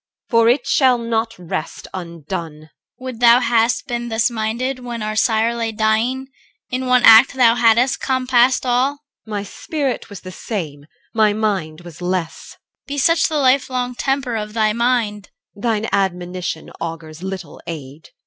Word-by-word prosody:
For 230 -1 +5
it 250 +4 +2
shall 260 -5 +3
not 230 -1 -2
rest 165 -3 -5
undone. 170 -2 -6 0.4
CHR. - - -16
Would 255 -3 -6
thou 240 0 +7
hadst 235 0 +1
been 240 -3 -4
thus 225 +2 +1
minded 235 +4 -2
when 240 -3 -6
our 215 0 -3
sire 225 +1 +2
Lay 230 -1 -2
dying! 220 +5 0 0.4
In 255 +1 -2
one 250 -1 +4
act 225 +5 +8
thou 240 -3 +5
hadst 240 +2 +3
compassed 255 -1 +2
all. 250 +2 +2
EL. 285 - -21 0.3
My 205 -2 -3
spirit 275 +6 -4
was 200 - -9
the 185 - -9
same: 155 -8 -6 0.3
my 215 -2 +3
mind 195 -7 -2
was 175 -1 -12
less. 175 -2 -3
CHR. - - -45
Be 285 0 -4
such 330 +4 +3
the 310 - -1
life 265 -1 +3
long 250 -1 -2
temper 270 -1 -1
of 210 -1 -4
thy 215 -1 +2
mind! 230 -3 0 0.3
EL. 200 - -14
Thine 225 -1 0
admonition 180 -3 -2
augurs 165 -1 -6
little 190 -4 -7
aid. 150 -2 -8
225 Hz, 170 wpm, -19 LUFS, 190-250 Hz, 0.4 s, act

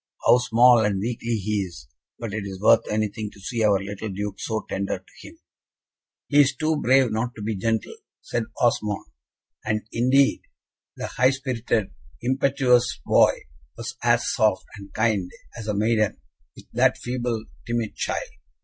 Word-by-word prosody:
How 125 - +6
small 120 -1 +5
and 100 -2 0
weakly 115 +2 -2
he 105 0 -1
is, 85 -10 -6 0.3
but 115 -4 -6
it 105 -1 -3
is 95 -2 -7
worth 110 +2 +4
anything 105 0 -2
to - - -16
see 115 +3 -2
our 105 -2 +4
little 100 +2 -6
Duke 100 +1 -5
so 110 -2 -3
tender 100 0 -2
to - - -16
him." - - -14 0.9
"He 145 - +6
is 140 -1 +2
too 155 0 0
brave 130 -3 +3
not 115 +3 -2
to 105 - -8
be 110 0 -2
gentle," 110 +2 -1 0.2
said 115 -1 -3
Osmond; 105 -4 +1 0.6
and, 105 0 -1
indeed, 130 +3 +3 0.6
the - - -4
high 130 +1 +2
spirited, 125 -6 -1 0.3
impetuous 130 - +2
boy - - +4 0.4
was - - -6
as - - +2
soft - - +2
and 100 -1 -11
kind 110 -5 0 0.3
as 110 -2 -7
a 105 - -1
maiden, 110 0 +1 0.4
with - - -14
that - - +3
feeble, 120 -2 -3 0.2
timid 115 -2 -2
child. - - -2
110 Hz, 160 wpm, -24 LUFS, 105-125 Hz, 0.9 s, How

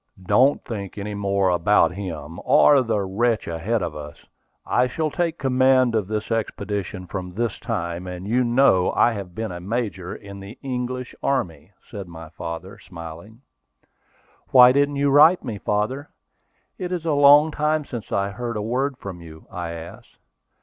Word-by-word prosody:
"Don't 125 +9 +3
think 105 -5 -6
any 105 +1 -4
more 100 -1 +1
about 90 -1 +3
him, 85 -4 -7
or 145 -2 +5
the 110 -4 0
wretch 110 +3 0
ahead 95 +6 -1
of 75 - -4
us. 75 -1 -10 0.4
I 125 +1 +2
shall 155 +4 -2
take 170 0 -1
command 130 -2 +3
of 110 -4 0
this 110 +1 -4
expedition 100 -4 -3
from 90 0 -5
this 110 +3 -3
time; 90 -6 -4
and 90 +1 -7
you 125 +4 +2
know 120 -6 +3
I 120 - +4
have 100 -5 -7
been 110 -3 -4
a 90 - -6
major 95 -2 -3
in 100 -1 -10
the 100 +5 -10
English 125 -1 -4
army," 90 - -2 0.2
said 100 -4 -8
my 80 -2 -10
father, 85 +6 -7
smiling. 85 +6 -11 1.1
"Why 125 -1 +8
didn't 140 +2 +2
you 140 0 +1
write 155 +6 +6
to - - -14
me, 110 -5 -5
father? 110 +10 -2 0.7
It 180 -1 -4
is 175 -3 -3
a 160 - +1
long 145 +2 +6
time 150 0 0
since 120 -6 -7
I 100 0 0
heard 120 +1 -4
a - - -2
word 130 +4 -1
from 95 -6 -8
you," 80 -1 -13
I 85 -1 -5
asked. 85 0 -10
105 Hz, 170 wpm, -23 LUFS, 90-130 Hz, 1.1 s, Why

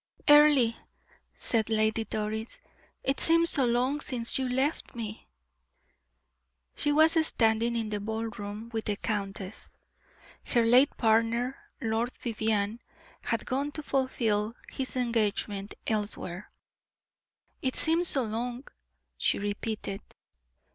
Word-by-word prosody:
"Earle," 295 -5 +7 0.6
said 225 -2 0
Lady 220 0 +2
Doris, 220 +1 -3 0.4
"it 270 - 0
seems 335 0 +5
so 270 -4 +4
long 250 +4 +1
since 240 -5 -1
you 260 -1 -1
left 265 +4 -1
me." 220 -2 -6 1.5
She 295 - +1
was 320 +2 +5
standing 225 +1 +2
in 225 -2 -2
the 210 -1 -2
ball 220 +2 -3
room 210 +1 -7
with 220 -1 -2
the 210 - 0
countess. 200 -1 -4 0.7
Her 235 -1 +2
late 250 +5 +5
partner, 230 +3 +2 0.3
Lord 225 +2 -1
Vivianne, 220 -2 -1 0.4
had 230 -2 -2
gone 275 +3 -1
to 305 - -4
fulfill 230 -6 0 0.2
his 265 -1 -4
engagement 210 -4 -1
elsewhere. 205 -3 -3 1.1
"It 260 -1 -1
seems 335 +2 +3
so 270 -4 +2
long," 240 +4 -4 0.5
she - - +2
repeated. 205 0 -3
230 Hz, 115 wpm, -29 LUFS, 215-260 Hz, 1.5 s, Earle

